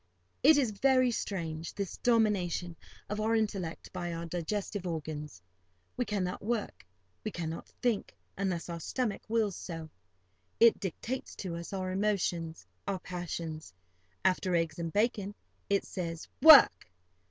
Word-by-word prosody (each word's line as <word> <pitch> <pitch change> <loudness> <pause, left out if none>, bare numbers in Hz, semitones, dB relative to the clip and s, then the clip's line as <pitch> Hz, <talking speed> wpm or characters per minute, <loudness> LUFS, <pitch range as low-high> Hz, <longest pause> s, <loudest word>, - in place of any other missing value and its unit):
It 300 +2 +7
is 255 -6 +2
very 255 +3 +3
strange, 165 -7 -3
this 200 -2 -4
domination 195 -7 +1 0.3
of 210 +1 -2
our 225 +1 +2
intellect 195 -7 -2
by 175 0 -3
our 165 0 -4
digestive 185 +3 -3
organs. 150 - -5 0.5
We 250 - 0
cannot 190 -4 -2
work, 225 0 -2 0.4
we - - -1
cannot 165 -1 -5 0.2
think, 235 -5 0 0.2
unless 185 -3 -2
our 170 -1 -5
stomach 220 - -2
wills 215 -4 +1
so. 165 -3 -7 0.7
It 230 -1 +7
dictates 220 +7 -4
to 180 -4 -4
us 170 0 -6
our 185 -1 -2
emotions, 180 -5 -1 0.2
our 200 -1 0
passions. 165 - -5 0.5
After 185 -1 +2
eggs 165 -1 0
and 165 -1 -2
bacon, 205 0 0 0.3
it 200 -1 +2
says, 165 -3 -5
"Work!" 310 -3 +9
185 Hz, 135 wpm, -31 LUFS, 170-215 Hz, 0.7 s, Work